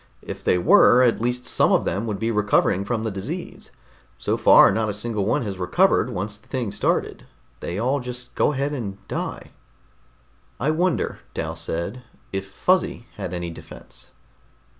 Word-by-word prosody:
If -, -, -7 dB
they -, -, +3 dB
were, 120 Hz, +7 st, +6 dB
at 120 Hz, -3 st, +2 dB
least 125 Hz, +1 st, -1 dB
some -, -, +2 dB
of -, -, +3 dB
them 105 Hz, +4 st, -2 dB
would 105 Hz, -2 st, -2 dB
be 115 Hz, +3 st, -1 dB
recovering 100 Hz, -2 st, +2 dB
from 110 Hz, +1 st, -2 dB
the 110 Hz, -, -2 dB
disease. 135 Hz, -, -6 dB, 0.5 s
So -, -, -1 dB
far -, -, +7 dB
not 110 Hz, +2 st, 0 dB
a 105 Hz, -, -2 dB
single 105 Hz, -2 st, -2 dB
one 115 Hz, -, +1 dB
has 100 Hz, -4 st, -5 dB
recovered 90 Hz, -, +2 dB
once 105 Hz, +3 st, -4 dB
the -, -, -26 dB
thing 125 Hz, -6 st, -3 dB
started. 100 Hz, -, -1 dB, 0.3 s
They 85 Hz, -, -4 dB
all 130 Hz, +6 st, +1 dB
just 125 Hz, -1 st, -8 dB
go -, -, +2 dB
ahead 140 Hz, +2 st, -1 dB
and 105 Hz, -8 st, -4 dB
die." -, -, -5 dB, 1.1 s
"I 145 Hz, +5 st, +1 dB
wonder," 175 Hz, +3 st, 0 dB, 0.2 s
Dal 80 Hz, 0 st, -3 dB
said, 85 Hz, +8 st, -4 dB, 0.3 s
"if 95 Hz, 0 st, -4 dB
Fuzzy 175 Hz, -, 0 dB
had 95 Hz, -4 st, -5 dB
any 85 Hz, -1 st, -4 dB
defense." -, -, -12 dB
110 Hz, 170 wpm, -23 LUFS, 95-125 Hz, 1.1 s, far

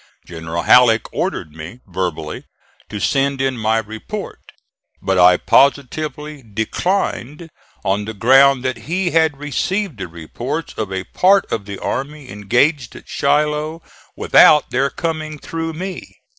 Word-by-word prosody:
General 80 Hz, 0 st, -5 dB
Halleck 120 Hz, -3 st, +4 dB
ordered 75 Hz, -, -3 dB
me, 80 Hz, +10 st, -10 dB
verbally, 90 Hz, -3 st, -4 dB, 0.4 s
to 105 Hz, -, -5 dB
send 135 Hz, +4 st, 0 dB
in 135 Hz, -1 st, 0 dB
my 110 Hz, -1 st, 0 dB
report, 110 Hz, -, -6 dB, 0.6 s
but 95 Hz, -1 st, 0 dB
I 90 Hz, 0 st, +7 dB
positively 150 Hz, +2 st, +1 dB
declined 145 Hz, -, -3 dB, 0.4 s
on 100 Hz, +1 st, 0 dB
the 110 Hz, +1 st, -6 dB
ground 135 Hz, +3 st, +5 dB
that 130 Hz, -2 st, -1 dB
he 180 Hz, +1 st, 0 dB
had 160 Hz, -3 st, +2 dB
received 150 Hz, -, -2 dB
the 95 Hz, -, -4 dB
reports 120 Hz, -, -6 dB
of 105 Hz, -3 st, -4 dB
a 95 Hz, -1 st, -3 dB
part 195 Hz, -, +3 dB
of 110 Hz, -3 st, -2 dB
the 100 Hz, -1 st, -7 dB
army 140 Hz, +4 st, -5 dB
engaged 120 Hz, +6 st, 0 dB
at -, -, -13 dB
Shiloh 150 Hz, +3 st, 0 dB, 0.3 s
without 150 Hz, -, +5 dB
their 135 Hz, +2 st, +1 dB
coming 155 Hz, -1 st, -4 dB
through 165 Hz, +2 st, -5 dB
me. 185 Hz, +3 st, -7 dB
135 Hz, 135 wpm, -18 LUFS, 105-155 Hz, 0.6 s, I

